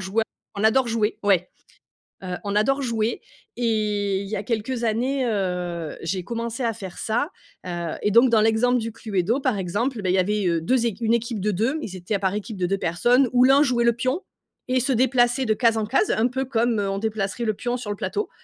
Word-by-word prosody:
joueurs. 200 +4 0 0.3
On 200 +1 -2
adore 240 +3 +4
jouer 225 -1 0
ouais, 190 -3 +2 0.8
heu, 180 -1 -3
on 205 0 -3
adore 270 +7 +2
jouer 230 -3 -1 0.4
et 210 -4 0
il 200 - -6
y 215 - -3
a 200 - -3
quelques 230 +3 -2
années, 250 +4 0
heu, 180 -7 -2
j'ai 180 +2 -2
commencé 235 +3 -4
à 230 - +1
faire 190 -3 -9
ça, 240 +7 -1 0.4
heu, 175 -2 -4
et 210 - +1
donc, 235 +4 +6
dans 225 -2 +4
l'exemple 225 +3 +3
du 230 0 -4
Cluedo, 215 +2 -1
par 260 -6 0
exemple, 215 +7 -2
bah, 185 - -1
il 180 - +3
y 190 - +3
avait, 205 +2 +1
heu, 170 -1 +1
2 240 +7 +1
équi 230 +1 -5
une 225 - +3
équipe 235 -1 -1
de 210 - +1
2. 230 - 0
Ils 190 -9 -6
étaient 185 +3 -3
à 200 - -1
par 190 -1 0
équipe 210 0 -5
de 180 - 0
2 195 +2 0
personnes, 240 +10 +3
où 250 0 +5
l'un 275 +3 +6
jouait 245 -4 +1
le 235 - +4
pion 255 +8 -1 0.5
et 255 - +3
se 270 +2 0
déplaçait 250 +1 +2
de 220 - +3
case 230 0 +2
en 215 - 0
case, 270 - +1
un 225 +3 +2
peu 265 +2 -2
comme 235 -3 +1
on 195 -1 -1
déplacerait 215 0 -2
le 215 - +1
pion 245 +4 -3
sur 230 -4 -7
le 205 - -2
plateau, 420 - -3
220 Hz, 230 wpm, -23 LUFS, 195-245 Hz, 0.8 s, donc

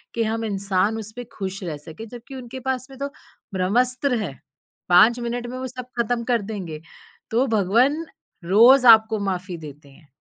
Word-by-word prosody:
कि 230 - +1
हम 225 +1 -2
इंसान 200 +1 0
उसपे 220 +3 -8
ख़ुश 195 -1 -5
रह 160 -4 -4
सकें। 160 +9 -10
जबकि 245 +4 -11
उनके 255 0 -8
पास 260 0 -2
में 265 - -12
तो, 280 0 -3 0.4
ब्रह्मस्त्र 250 +8 +1
है, 155 -9 -5 0.6
5 215 +7 +6
मिनट 240 0 -3
में 250 +1 -6
वो 260 0 -4
सब 250 0 -8
ख़त्म 235 0 0
कर 240 -3 +1
देंगे। 175 -8 -6 0.5
तो 240 +4 +2
भगवन 235 - +2 0.4
रोज़ 240 +8 +6
आपको 220 -1 +7
माफ़ी 185 -2 -3
देते 150 -2 -11
हैं 145 +3 -20
225 Hz, 170 wpm, -23 LUFS, 190-245 Hz, 0.6 s, आपको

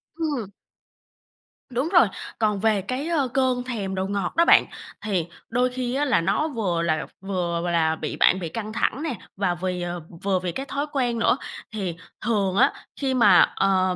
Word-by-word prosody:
Ừm. 290 - -2 1.2
Đúng 260 +5 -1
rồi, 345 - +6 0.3
còn 210 -2 +1
về 215 -1 +2
cái, 255 - -3
ơ, 310 -6 +1
cơn 255 -1 +1
thèm 210 -7 -3
đồ 190 0 -1
ngọt 200 -2 -2
đó 335 - +5
bạn, - - +7 0.4
thì 185 -6 0 0.2
đôi 250 +1 +2
khi 250 -1 -3
á 290 +2 +1
là 245 -10 +3
nó 195 - +1
vừa 200 - -1
là 160 -2 0 0.2
vừa 175 -3 -2
là 160 -2 +2
bị - - -4
bạn 185 - +4
bị 170 -3 -4
căng 215 +1 -5
thẳng 270 +5 0
nè, 315 -5 -1 0.2
và 180 -3 +1
vì, 180 0 -3
ờ 175 0 -4 0.2
vừa 195 -2 +2
vì 180 -1 -3
cái 270 +9 -4
thói 280 +1 -2
quen 245 -4 0
nữa. 250 - +3 0.4
Thì 190 -6 -3 0.3
thường 200 -5 +1
á 245 - +5 0.3
khi 270 -2 +1
mà, 210 -8 +6 0.2
ờ, 185 -1 +2
210 Hz, 190 wpm, -24 LUFS, 185-255 Hz, 1.2 s, bạn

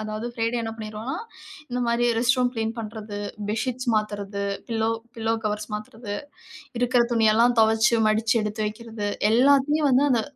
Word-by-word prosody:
அதாது 215 +2 -4
பிரைடே 230 +1 -1
என்ன 225 - -3
பண்ணிருவோம்னா, 215 +3 -5 0.5
இந்த 250 - -1
மாரி 235 +1 +1
ரெஸ்ட் 250 +3 +3
ரூம் 250 -1 +2
கிளீன் 225 0 -1
பண்றது, 215 -1 -6 0.3
பெட்ஷீட்ஸ் 250 +3 -2
மாததுறது 205 -1 -2 0.3
பில்லோ 225 -1 0 0.3
பில்லோ 225 0 0
கவர்ஸ் 210 0 -2
மாத்துறது. 215 0 -6 0.7
இருக்கிற 245 0 +3
துணியெல்லாம் 230 +1 +4
துவச்சு 220 +1 +4
மடிச்சு 220 +1 +2
எடுத்து 210 +1 -3
வைக்கிறது 220 -1 -5 0.2
எல்லாத்தையும் 280 +4 +4
வந்து 265 +2 +4
அந்த 240 -3 +3
225 Hz, 145 wpm, -24 LUFS, 215-245 Hz, 0.7 s, துணியெல்லாம்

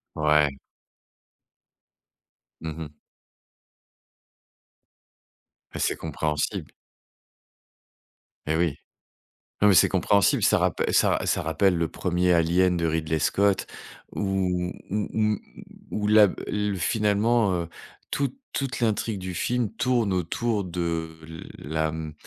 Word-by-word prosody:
Ouais. 75 -2 +2 2.0
Mmh 80 -1 -5
mh. 75 -2 -7 2.8
Bah, - - -6
c'est - - +1
compréhensible. 75 -1 -3 1.7
Et 80 - +1
oui. 85 -4 +1 0.9
Non, 105 - +6
mais 100 - +6
c'est - - +6
compréhensible, 100 -3 +2
ça - - +4
rappe - - 0
ça - - +4
ra - - -5
ça - - +1
rappelle 90 +3 +2
le 85 -1 +1
1er 90 +1 0
Alien 90 +2 +3
de 85 - -1
Ridley 80 -1 0
Scott 100 +4 +2 0.4
où 90 -3 -1 0.2
où 105 +1 -1
où 105 -2 +1 0.5
où 105 -1 -1
la 105 -1 +7
b - - -4
l 105 -1 -1
finalement, 105 +1 +2
heu, 85 - -7 0.4
toute 140 0 -1 0.2
toute 135 -3 -3
l'intrigue 110 -2 0
du 90 -1 -5
film 120 +3 -1
tourne 120 -4 +1
autour 100 +4 -1
de 85 -2 -3 0.4
la, 80 +2 -2
mmh, 80 -1 -5
90 Hz, 115 wpm, -25 LUFS, 80-105 Hz, 2.8 s, la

